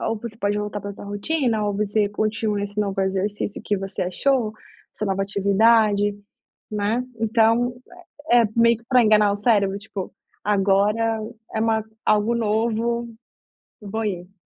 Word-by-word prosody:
ou 225 - -1
você 225 -1 -7
pode 205 -1 0
voltar 210 0 -4
para 200 0 -6
sua - - -10
rotina, 220 +2 -1
ou 205 -1 -1
você 210 0 +1
continua 210 0 -1
esse 205 +1 -3
novo 195 -1 -2
exercício 195 +2 -2
que 205 - 0
você 195 0 -6
achou, 225 +6 +1 0.4
essa 215 - -3
nova 195 0 0
atividade, 205 +1 +3 0.5
né. 215 +4 -1 0.2
Então 230 +2 +2 0.6
é 240 0 +7
é - - +3
meio 230 -1 +4
que 230 - -22
para 250 -1 +4
enganar 210 -1 +4
o - - 0
cérebro, 205 -3 +2
tipo: 205 -3 -6 0.3
"Agora 210 +3 +2 0.3
é 220 - -1
uma 220 -1 +1 0.2
algo 215 +2 +3
novo, 230 +2 0 0.7
vou 215 +2 -4
ir". 180 -2 -4
210 Hz, 155 wpm, -23 LUFS, 200-225 Hz, 0.7 s, é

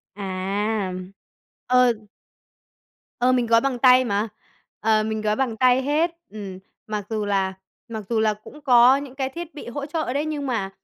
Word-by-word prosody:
À! 195 +1 -2 0.7
Ờ. 250 -1 +5 1.3
Ờ, 250 +1 +4
mình 250 -2 +2
gói 230 0 +5
bằng 270 -3 -1
tay 255 0 +6
mà. 205 0 0 0.5
Ờ, 215 0 +3
mình 220 0 -2
gói 210 0 +1
bằng 240 -2 -1
tay 255 +1 +4
hết. 300 +5 +1 0.2
Ừm. 200 -3 -8 0.3
Mặc 210 -2 -3
dù 215 -2 -2
là 195 -2 0 0.3
mặc 220 -2 -6
dù 230 -2 +1
là 215 -1 +3
cũng 215 +8 -14
có 250 -1 +6
những 280 -2 -8
cái 265 -1 -2
thiết 340 +3 -8
bị 300 - -9
hỗ 280 +4 -4
trợ 310 -3 -2
đấy, 290 +2 0
nhưng 295 -2 -3
mà, 220 -7 -1
235 Hz, 175 wpm, -23 LUFS, 210-265 Hz, 1.3 s, tay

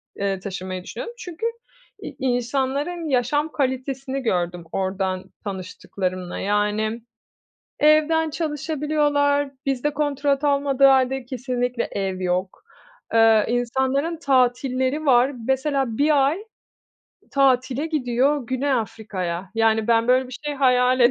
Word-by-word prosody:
eee, 195 -1 -1
taşınmayı 185 -1 -5
düşünüyordum. 480 - -7
Çünkü 355 +1 -6 0.6
i - - -7
insanların 265 +6 -1
yaşam 290 +5 +1
kalitesini 265 0 -2
gördüm, 175 -6 -1
oradan 190 -1 -2 0.2
tanıştıklarımla. 185 -2 -5
Yani, 210 +3 0 0.8
evden 310 +1 +4
çalışabiliyorlar, 295 -2 0
bizde 275 +2 0
kontrat 285 -1 0
olmadığı 280 -1 +3
hâlde 265 -1 +3
kesinlikle 250 -1 -2
ev 190 -2 -2
yok. 185 +1 -2 0.5
Iıı, 225 -2 +5
insanların 265 +7 0
tatilleri 260 +1 +1
var. 255 +1 +4 0.2
Mesela 265 -3 0
1 285 -2 +4
ay 375 +9 -2 0.9
tatile 270 +1 +2
gidiyor, 265 -2 0
Güney 265 +2 -1
Afrika'ya. 195 -7 -3
Yani, 225 0 +2
ben 230 0 +3
böyle 255 +1 +3
bir 250 - -8
şey 295 - -1
hayal 255 -1 +3
edemem. 245 - +6
260 Hz, 110 wpm, -23 LUFS, 225-285 Hz, 0.9 s, edemem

